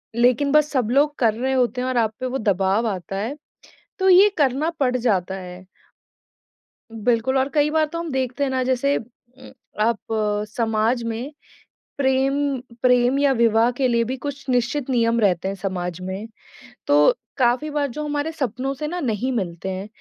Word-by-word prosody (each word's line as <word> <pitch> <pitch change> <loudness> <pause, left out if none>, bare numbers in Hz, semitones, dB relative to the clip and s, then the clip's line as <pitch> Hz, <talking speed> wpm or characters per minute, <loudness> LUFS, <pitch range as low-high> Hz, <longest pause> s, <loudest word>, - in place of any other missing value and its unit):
लेकिन 250 +4 +3
बस 300 0 +4
सब 250 -6 0
लोग 290 +3 +3
कर 225 -4 +3
रहे 260 +3 -1
होते 250 -1 +1
हैं 255 - -2
और 255 - -1
आप 220 -2 +1
पे - - -2
वो 255 +1 -2
दबाव 200 +2 +1
आता 195 -2 -4
है, 230 +9 -3 0.6
तो 380 0 +3
ये 380 +3 +7
करना 285 +1 +1
पड़ 255 -3 +1
जाता 195 -6 0
है। 180 -1 -9 1.3
बिल्कुल 230 +4 +1
और 265 +1 +1
कई 295 0 +3
बार 315 0 +2
तो 335 +3 -6
हम 335 -1 -4
देखते 260 +1 -2
हैं 270 - -1
ना 260 -1 0
जैसे 260 +2 +1
उम, 245 +2 -11 0.3
आप 225 +1 +2 0.6
समाज 225 +1 +1
में 230 +5 -4 0.7
प्रेम 265 0 +2 0.5
प्रेम 250 +2 +3
या 285 -1 +3
विवाह 230 -1 +3
के 255 +1 0
लिए 235 -1 +2
भी 255 +3 -4
कुछ 280 +1 -6
निश्चित 250 +3 0
नियम 235 -2 +2
रहते 190 -3 +1
हैं 195 - -3
समाज 180 -3 -4
में। 190 +4 -5 0.6
तो 145 +1 +5 0.3
काफ़ी 255 +4 +2
बार 295 -1 -1
जो 290 +4 -6
हमारे 295 +1 -2
सपनों 265 -3 -3
से 300 +3 -5
ना 355 +3 -4
नहीं 250 - -1
मिलते 185 -6 -3
हैं, 190 +2 -5
250 Hz, 180 wpm, -22 LUFS, 220-275 Hz, 1.3 s, ये